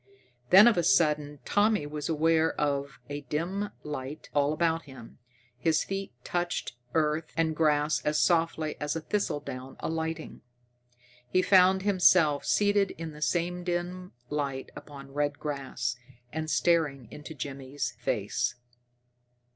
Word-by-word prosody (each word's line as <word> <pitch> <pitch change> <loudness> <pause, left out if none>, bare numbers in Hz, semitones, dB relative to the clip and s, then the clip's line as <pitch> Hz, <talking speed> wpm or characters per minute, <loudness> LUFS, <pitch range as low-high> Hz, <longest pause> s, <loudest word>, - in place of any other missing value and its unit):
Then 195 +4 +9
of 235 - +4
a 175 - +2
sudden 150 -3 +2
Tommy 205 -4 +2
was 150 0 -5
aware 160 +1 +2
of 140 -2 -1
a 145 0 -5
dim 180 +8 -2
light 145 0 -6
all 145 0 +2
about 165 +1 0
him. 130 -5 -13 0.4
His 160 +4 +2
feet 195 0 -4
touched 175 -5 -2 0.2
earth 155 0 +1
and 160 -1 +1
grass 150 -1 +2
as 150 0 +1
softly 165 -3 +1
as 150 +1 -1
a 165 - -2
thistledown 145 -9 -3
alighting. 160 0 -4 0.9
He 185 +8 +2
found 185 0 +5
himself 180 -7 +4
seated 205 -1 +2
in 165 -1 -5
the 150 0 -12
same 175 +2 0
dim 180 +1 -3
light 140 -2 -3
upon 140 -2 -11
red 145 0 0
grass, 135 -4 -3 0.4
and 160 0 -3
staring 150 -8 +1
into 150 +1 -9
Jimmy's 135 +1 -4
face. 130 - -1
155 Hz, 130 wpm, -28 LUFS, 145-175 Hz, 0.9 s, Then